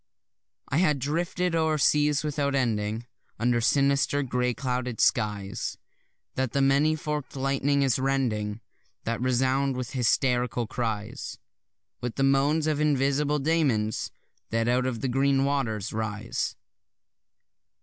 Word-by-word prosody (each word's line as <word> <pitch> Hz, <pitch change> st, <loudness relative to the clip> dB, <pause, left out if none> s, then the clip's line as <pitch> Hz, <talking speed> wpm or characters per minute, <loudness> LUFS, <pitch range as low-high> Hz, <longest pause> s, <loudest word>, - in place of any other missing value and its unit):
I 140 Hz, -, 0 dB
have 155 Hz, -4 st, +3 dB
drifted 170 Hz, +5 st, -1 dB
o'er 160 Hz, -1 st, +2 dB
seas 150 Hz, 0 st, +3 dB
without 145 Hz, -2 st, -1 dB
ending, 110 Hz, -3 st, -1 dB, 0.3 s
Under 120 Hz, 0 st, +1 dB
sinister 140 Hz, +2 st, +2 dB
grey 125 Hz, -1 st, 0 dB
clouded 125 Hz, -3 st, -3 dB
skies 100 Hz, -2 st, 0 dB, 0.6 s
That 130 Hz, -2 st, -2 dB
the 140 Hz, -, +2 dB
many 140 Hz, +3 st, +3 dB
fork'd 150 Hz, -3 st, -4 dB
lightning 140 Hz, +1 st, +1 dB
is 130 Hz, -2 st, +2 dB
rending, 115 Hz, -6 st, -1 dB, 0.4 s
That 115 Hz, +1 st, -2 dB
resound 130 Hz, +1 st, +1 dB
with 125 Hz, -1 st, -4 dB
hysterical 125 Hz, -1 st, +1 dB
cries; 110 Hz, -2 st, -4 dB, 0.6 s
With 120 Hz, -1 st, -3 dB
the 135 Hz, -, 0 dB
moans 140 Hz, +3 st, +3 dB
of 155 Hz, -1 st, 0 dB
invisible 145 Hz, 0 st, +2 dB
daemons 135 Hz, -8 st, +1 dB, 0.4 s
that 115 Hz, +1 st, 0 dB
out 125 Hz, +1 st, +2 dB
of 120 Hz, -3 st, -3 dB
the 135 Hz, -, 0 dB
green 135 Hz, +1 st, +2 dB
water 135 Hz, -6 st, 0 dB
rise. 110 Hz, 0 st, -3 dB
135 Hz, 125 wpm, -27 LUFS, 120-145 Hz, 0.6 s, have